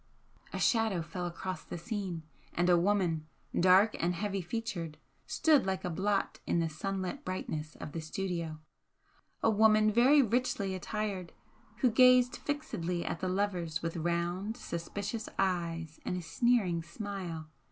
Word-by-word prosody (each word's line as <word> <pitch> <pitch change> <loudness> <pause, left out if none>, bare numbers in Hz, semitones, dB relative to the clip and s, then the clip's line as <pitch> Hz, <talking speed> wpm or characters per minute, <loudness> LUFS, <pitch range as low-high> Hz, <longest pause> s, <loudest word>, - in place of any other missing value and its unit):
A - - -4
shadow 220 -7 +2
fell 175 +2 -4
across 185 +2 -5
the - - -6
scene, 185 -3 -4 0.3
and 175 +1 +3
a - - +7
woman, 175 -5 +1 0.3
dark 190 +4 +5
and 175 +1 +1
heavy 195 +1 -2
featured, 175 -5 -4 0.3
stood 300 -10 +3
like 190 -1 -1
a 180 - -1
blot 195 +4 0
in - - +2
the 165 -1 +1
sunlit 195 - -3
brightness 155 - -4
of - - -7
the 165 - -4
studio, 165 -1 -3 0.9
a 225 - +5
woman 215 0 +5
very 265 +6 +6
richly 225 -4 0
attired, 190 -2 -3 0.5
who 250 - +4
gazed 250 +1 +6
fixedly 180 - -3
at - - -2
the 185 - -1
lovers 180 -5 -1
with 165 0 -2
round, 175 +6 -1
suspicious 205 +5 -4
eyes 170 -4 -1
and 180 - -2
a - - -3
sneering 180 0 +2
smile. 170 -3 -6
185 Hz, 145 wpm, -32 LUFS, 170-215 Hz, 0.9 s, a